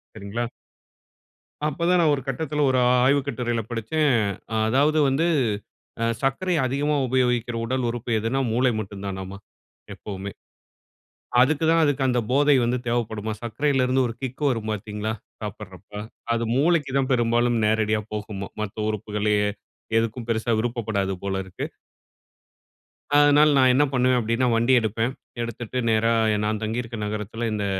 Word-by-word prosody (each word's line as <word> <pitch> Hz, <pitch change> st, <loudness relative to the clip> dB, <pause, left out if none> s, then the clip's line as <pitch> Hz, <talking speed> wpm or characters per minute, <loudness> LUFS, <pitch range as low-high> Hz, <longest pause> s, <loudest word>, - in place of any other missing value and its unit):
சரிங்களா! 110 Hz, +3 st, -3 dB, 1.2 s
அப்ப 170 Hz, +3 st, -2 dB
தான் 180 Hz, 0 st, +4 dB
நான் 155 Hz, -3 st, +4 dB
ஒரு 135 Hz, -, -4 dB
கட்டத்தில 150 Hz, +2 st, -1 dB
ஒரு 130 Hz, -, +2 dB
ஆ -, -, +5 dB, 0.2 s
ஆய்வு 140 Hz, +2 st, +4 dB
கட்டுரையில 120 Hz, -3 st, -2 dB
படிச்சேன். 130 Hz, +5 st, +1 dB, 0.4 s
அ -, -, -1 dB
அதாவது 145 Hz, +6 st, +3 dB
வந்து 140 Hz, +5 st, +2 dB, 0.8 s
ஆ -, -, +3 dB, 0.2 s
சர்க்கரை 155 Hz, +7 st, 0 dB
அதிகமாக 140 Hz, +2 st, 0 dB
உபயோகிக்கிற 125 Hz, -2 st, +1 dB
உடல் 130 Hz, +1 st, -1 dB
உறுப்பு 120 Hz, 0 st, -4 dB
எதுனா? 115 Hz, +5 st, -1 dB
மூளை 125 Hz, +2 st, +3 dB
மட்டும் 100 Hz, -1 st, -7 dB
தானாமா 95 Hz, 0 st, -5 dB, 0.6 s
எப்பவுமே. 100 Hz, -1 st, -7 dB, 1.1 s
அதுக்கு 150 Hz, +4 st, +3 dB
தான் 165 Hz, 0 st, +4 dB, 0.3 s
அந்த 125 Hz, -1 st, +2 dB
போதை 145 Hz, +1 st, +5 dB
வந்து 125 Hz, +2 st, 0 dB
தேவைப்படுமாம். 110 Hz, -2 st, -2 dB
சர்க்கரையில 130 Hz, +3 st, +1 dB
இருந்து 130 Hz, +1 st, +2 dB
ஒரு 115 Hz, -, -6 dB
கிக் 130 Hz, +2 st, -5 dB
வரும் 115 Hz, -3 st, -2 dB
பாத்தீங்களா 105 Hz, +1 st, -4 dB, 0.3 s
சாப்பிடறப்ப, 105 Hz, -2 st, -8 dB, 0.4 s
அது 115 Hz, 0 st, 0 dB
மூளைக்கு 150 Hz, -1 st, +2 dB
தான் 135 Hz, 0 st, 0 dB
பெரும்பாலும் 120 Hz, 0 st, +2 dB
நேரடியா 110 Hz, 0 st, +2 dB
போகுமாம். 105 Hz, -2 st, -5 dB
மற்ற 100 Hz, -, -5 dB
உறுப்புகள்லயே 105 Hz, 0 st, 0 dB, 0.5 s
எதுக்கும் 115 Hz, +1 st, -2 dB
பெரிசா 115 Hz, +1 st, 0 dB
விருப்பப்படாது 110 Hz, -5 st, -1 dB
போல 95 Hz, -1 st, -2 dB
இருக்கு. 95 Hz, -1 st, -6 dB, 1.5 s
அதனால 145 Hz, +1 st, +6 dB
நான் 130 Hz, -1 st, +6 dB
என்ன 145 Hz, -, +4 dB
பண்ணுவேன் 125 Hz, 0 st, +3 dB
அப்படின்னா 115 Hz, +3 st, 0 dB
வண்டி 120 Hz, +3 st, +3 dB
எடுப்பேன். 115 Hz, +3 st, -1 dB, 0.3 s
எடுத்துட்டு 120 Hz, +1 st, -5 dB
நேரா 115 Hz, +1 st, +3 dB, 0.2 s
எ -, -, +1 dB
நான் 110 Hz, 0 st, -1 dB
தங்கியிருக்க 115 Hz, +2 st, -3 dB
நகரத்தில, 110 Hz, +2 st, -3 dB
இந்த 105 Hz, -1 st, -2 dB
120 Hz, 140 wpm, -24 LUFS, 110-130 Hz, 1.5 s, அதனால